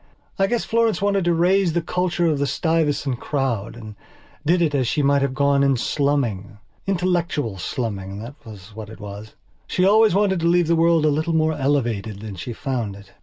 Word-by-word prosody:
I 195 - +3
guess 240 +2 -1
Florence 225 -4 +1
wanted 200 -2 +1
to 175 - +3
raise 180 +1 +2
the 170 - +1
culture 175 0 -1
of 155 -4 +1
the 140 - 0
Stuyvesant 145 -3 0
crowd 125 -7 -2
and 110 -3 -10 0.5
did 170 +4 +2
it 160 -4 +1
as 130 -4 +1
she 150 - 0
might 140 0 +3
have 135 -1 -1
gone 140 0 +2
in 135 -2 +3
slumming. 120 -7 -1 0.3
Intellectual 170 - -1
slumming, 100 -2 -4
that 115 +6 -8
was 105 -2 -12
what 110 -2 -8
it 110 - -11
was. 105 +1 -9 0.3
She 185 - +1
always 215 -1 +5
wanted 195 -2 +2
to 165 - 0
leave 175 0 +3
the 170 +1 +2
world 165 -1 +3
a - - +4
little 155 +3 0
more 160 0 +2
elevated 120 -8 -1
than 110 -2 -7
she 95 +7 -6
found 115 -4 -3
it. 100 0 -15
145 Hz, 200 wpm, -22 LUFS, 115-170 Hz, 0.5 s, always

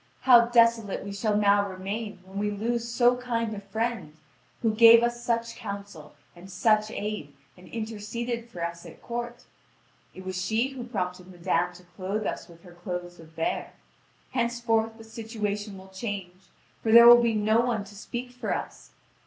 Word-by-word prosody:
How 240 -3 +7
desolate 230 -3 +3
we 200 - -6
shall 210 +1 0
now 205 -1 +3
remain 195 +1 -5
when 190 +1 -7
we 210 0 0
lose 230 +3 -2
so 245 +1 +3
kind 230 -3 -2
a 205 - -5
friend, 220 -6 -3 0.5
who 225 -2 +2
gave 230 +1 +8
us 240 0 -1
such 230 -1 -1
counsel 200 -8 -8 0.2
and 175 +2 -13
such 215 +3 +2
aid, 205 -10 -5 0.2
and 180 0 -16
interceded 230 +2 -5
for 175 -6 -4
us 170 0 -6
at - - -12
court! 240 0 -5 0.7
It 185 - -10
was 185 -1 -3
she 225 +6 +1
who 260 -3 -7
prompted 180 -6 -4
madame 180 -1 -1
to 180 +1 -15
clothe 190 +4 -4
us - - -4
with 170 -1 -17
her 175 -2 -14
clothes 175 0 -6
of 165 - -13
vair. 165 +1 -3 0.6
Henceforth 235 -2 0
the 225 - -12
situation 210 -2 -4
will 190 0 -13
change, 190 -2 -6 0.3
for 220 - 0
there 235 +1 +10
will 240 0 +10
be 230 -2 +1
no 215 +2 +3
one 235 -3 0
to 200 +1 -14
speak 240 +4 -6
for 250 - -3
us! - - -8
215 Hz, 175 wpm, -27 LUFS, 190-235 Hz, 0.7 s, there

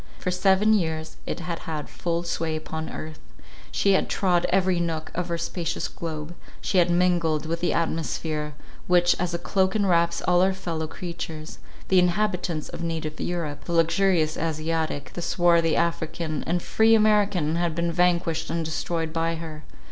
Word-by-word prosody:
For 180 - -2
seven 195 +3 +4
years 160 -5 -1
it - - -3
had 170 -1 -4
had 155 -2 -5
full 170 0 -2
sway 165 -2 -2
upon 160 0 -5
earth; 155 -1 -7 0.5
she 200 - +2
had 190 - +2
trod 180 -3 +2
every 185 -1 +2
nook 165 -2 -2
of 180 0 -3
our 170 - -1
spacious 170 0 -2
globe; 160 -1 -6 0.3
she 190 - +1
had 175 0 +4
mingled 175 -3 +2
with 165 +1 -2
the 175 - +1
atmosphere, 155 -2 -2 0.3
which 175 -1 +4
as 175 -1 -1
a - - +1
cloak 190 +2 +1
enwraps 170 -5 +2
all 180 0 +4
our 190 +1 +3
fellow 165 -4 -3
creatures—the 170 +2 -3
inhabitants 180 -3 0
of - - -8
native 160 -2 -3
Europe—the 170 -2 -3
luxurious 170 -1 +2
Asiatic—the 160 0 -2
swarthy 170 -2 +3
African 160 -2 -1
and 175 +1 0
free 225 +1 +4
American 205 -7 +3
had 170 -2 0
been 170 0 0
vanquished 170 -2 +1
and 165 -1 -1
destroyed 160 0 -2
by 165 0 0
her. 160 -2 -7
170 Hz, 155 wpm, -25 LUFS, 160-180 Hz, 0.5 s, seven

